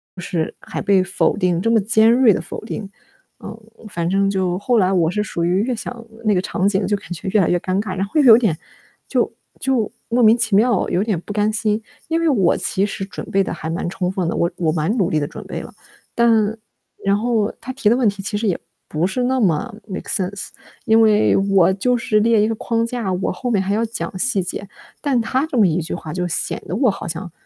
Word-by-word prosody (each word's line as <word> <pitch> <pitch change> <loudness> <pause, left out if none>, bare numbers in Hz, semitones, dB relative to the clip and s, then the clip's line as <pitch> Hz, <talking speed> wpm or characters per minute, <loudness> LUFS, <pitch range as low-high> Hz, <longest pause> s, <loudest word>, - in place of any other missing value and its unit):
就 180 - -8
是 165 -2 -2
还 - - -6
被 195 -2 +3
否 190 +3 +1
定 180 -4 +1
这 230 - +1
么 225 - +4
尖 220 +2 +4
锐 245 -1 +5
地 - - +1
否 - - -7
定。 215 -2 -6 0.5
嗯， - - -7 0.3
反 170 -2 -2
正 195 +2 +2
就 185 -2 0
后 240 +4 +1
来 190 -2 +3
我 170 -4 +2
是 210 +4 -1
属 170 -4 -3
于 180 +3 +2
越 250 0 -1
想 235 +1 -7 0.2
那 210 -3 +2
个 - - +2
场 190 +1 0
景 195 -1 0
就 205 +2 +1
感 195 - -10
觉 175 +2 -6
越 210 +1 +3
来 175 - +1
越 175 - +3
尴 185 +3 -1
尬， 190 -3 -5
然 195 - 0
后 200 - -15
又 - - +2
有 230 -4 +9
点 215 -10 +1 0.5
就 - - 0 0.3
就 260 -5 0 0.2
莫 240 +2 +2
名 225 0 +6
其 225 -4 +1
妙 225 -1 +3
有 185 - +1
点 210 -6 -1
不 205 - -7
甘 210 +1 +1
心。 215 0 0 0.3
因 330 +1 0
为 335 - +2
我 195 - +3
其 195 +1 -1
实 195 - -5
准 195 - -7
备 195 0 +3
得 - - -4
还 160 -2 -6
蛮 170 +1 -2
充 185 -1 -2
分 185 -3 -1
的， - - -2
我 170 - +1
我 165 -3 +1
蛮 160 +8 0
努 190 -7 +1
力 155 - +1
地 145 - -1
准 - - -9
备 - - -5
了。 - - -11 0.4
但 225 -2 +3 0.5
然 200 0 +2
后 225 -1 0
他 260 +2 -6
提 250 -5 +1
的 235 - +4
问 250 -3 +2
题 200 -1 -1
其 205 +2 -3
实 220 - -2
也 185 - +1 0.3
不 160 +4 0
是 250 +6 -2
那 260 +1 +1
么 205 +2 +1
make 190 -3 -6
sense， 195 +1 -3 0.4
因 225 -1 +5
为 215 -1 +4
我 195 -2 +3
就 245 +6 +1
是 225 -2 +1
列 225 +1 +3
一 - - +2
个 225 - -1
框 230 +1 -1
架， 230 -5 -3
我 185 +1 -1
后 250 - -4
面 215 -5 +2
还 200 - -1
要 220 +2 +1
讲 195 -6 -5
细 210 -4 0
节。 190 +2 -6 0.3
但 275 -5 +1
他 260 +6 0
这 275 - -3
么 215 - +6
一 170 +1 0
句 160 - -4
话 155 0 -7
就 180 -1 -2
显 165 - -3
得 175 - -3
我 245 0 +3
好 195 - -7
像 170 +2 -5
205 Hz, 285 characters per minute, -20 LUFS, 185-230 Hz, 0.5 s, 有